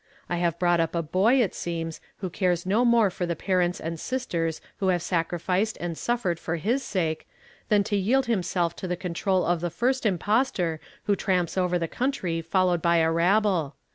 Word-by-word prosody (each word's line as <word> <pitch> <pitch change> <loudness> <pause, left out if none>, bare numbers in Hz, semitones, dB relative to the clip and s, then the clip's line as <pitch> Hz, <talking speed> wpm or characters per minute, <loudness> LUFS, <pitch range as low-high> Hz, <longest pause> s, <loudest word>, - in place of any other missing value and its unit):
I 175 - -2
have 170 -1 0
brought 175 -1 +2
up 165 +1 0
a 170 - 0
boy, 200 - +3
it 195 - -2
seems, 165 -1 -4 0.2
who 185 -3 -3
cares 180 -1 0
no 210 +6 +2
more 235 -5 +4
for 180 0 -3
the 170 - -1
parents 180 0 0
and 165 0 -5
sisters 170 -12 -2 0.2
who 195 - -1
have 175 -2 +1
sacrificed 180 +4 0
and 170 -1 -3
suffered 195 -5 -1
for 170 - -3
his 225 - 0
sake, 165 -9 -2 0.4
than 205 -1 +4
to 205 +1 -1
yield 240 +7 +2
himself 180 -6 0
to 185 - -5
the 180 0 -2
control 185 +1 0
of 175 -1 +1
the 175 - -1
fii 245 +10 +1
st 260 -2 -8
impostor 190 -3 0 0.2
who 205 - +2
tramps 180 -4 0
over 180 -1 +1
the 165 -1 -2
country 190 - -2
followed 180 +1 +1
by 170 +1 +3
a 160 0 +3
rabble. 175 -3 +2
180 Hz, 200 wpm, -26 LUFS, 170-205 Hz, 0.4 s, more